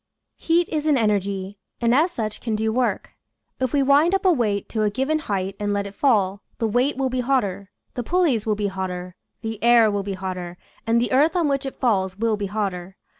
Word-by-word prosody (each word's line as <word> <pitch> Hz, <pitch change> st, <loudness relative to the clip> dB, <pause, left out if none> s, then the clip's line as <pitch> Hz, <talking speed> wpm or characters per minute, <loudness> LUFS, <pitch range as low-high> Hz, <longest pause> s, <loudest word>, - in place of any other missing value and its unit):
Heat 340 Hz, +1 st, +2 dB
is 310 Hz, -1 st, -2 dB
an 295 Hz, -3 st, +4 dB
energy, 200 Hz, -3 st, -1 dB, 0.2 s
and 235 Hz, 0 st, +2 dB
as 310 Hz, +7 st, +4 dB
such 215 Hz, -9 st, -4 dB
can 225 Hz, -3 st, -2 dB
do 220 Hz, +1 st, 0 dB
work. 250 Hz, 0 st, -1 dB, 0.5 s
If 260 Hz, -2 st, 0 dB
we 280 Hz, -1 st, +2 dB
wind 290 Hz, +7 st, +4 dB
up 390 Hz, 0 st, -2 dB
a 370 Hz, -, +6 dB
weight 210 Hz, -7 st, -1 dB
to 220 Hz, -, -2 dB
a 210 Hz, -, +2 dB
given 270 Hz, +8 st, 0 dB
height 195 Hz, -7 st, -3 dB
and 205 Hz, 0 st, -1 dB
let 200 Hz, 0 st, -1 dB
it 200 Hz, -, -8 dB
fall, 200 Hz, -6 st, +1 dB, 0.2 s
the 225 Hz, -, 0 dB
weight 245 Hz, +6 st, +1 dB
will 265 Hz, -1 st, 0 dB
be 255 Hz, -, -1 dB
hotter, 220 Hz, -7 st, -1 dB, 0.2 s
the 245 Hz, -, -3 dB
pulleys 295 Hz, -, +1 dB
will 215 Hz, -, +2 dB
be 205 Hz, 0 st, -2 dB
hotter, 185 Hz, -2 st, -4 dB, 0.3 s
the 225 Hz, -2 st, -5 dB
air 235 Hz, -2 st, +6 dB
will 205 Hz, 0 st, -1 dB
be 195 Hz, 0 st, -4 dB
hotter, 185 Hz, -2 st, -5 dB, 0.3 s
and 230 Hz, +1 st, +3 dB
the 240 Hz, -, -1 dB
earth 295 Hz, +6 st, +3 dB
on 340 Hz, -4 st, +2 dB
which 275 Hz, -1 st, -1 dB
it 270 Hz, -, -8 dB
falls 190 Hz, -6 st, +1 dB
will 225 Hz, 0 st, +1 dB
be 205 Hz, -1 st, -3 dB
hotter. 190 Hz, -3 st, -4 dB
220 Hz, 225 wpm, -23 LUFS, 200-265 Hz, 0.5 s, a